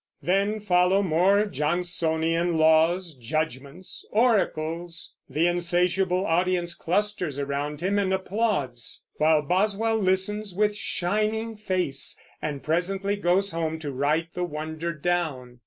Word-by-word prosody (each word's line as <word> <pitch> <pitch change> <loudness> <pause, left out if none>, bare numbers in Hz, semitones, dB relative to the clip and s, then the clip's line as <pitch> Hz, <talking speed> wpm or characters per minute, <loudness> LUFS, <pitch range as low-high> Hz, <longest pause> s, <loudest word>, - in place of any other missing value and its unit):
Then 200 +4 +1
follow 190 0 +3
more 190 +4 +3
Johnsonian 165 0 0
laws, 160 +2 +3
judgments, 140 +5 -4
oracles; 175 -7 0 0.2
the 160 +3 +1
insatiable 180 +2 +1
audience 175 0 +1
clusters 180 -4 -1
around 145 +2 -3
him 200 +3 +1
and 190 -2 0
applauds; 190 - -1
while 155 0 +4
Boswell 210 +7 +1
listens, 195 0 -1
with 210 +1 +2
shining 215 +4 -1
face, 185 -10 -2 0.2
and 145 -3 -4
presently 195 +5 0
goes 195 +1 +1
home 160 -1 -2
to 150 -3 -5
write 150 +5 0
the 180 - -2
wonder 160 0 -4
down. 150 -7 -2
175 Hz, 115 wpm, -26 LUFS, 155-195 Hz, 0.2 s, while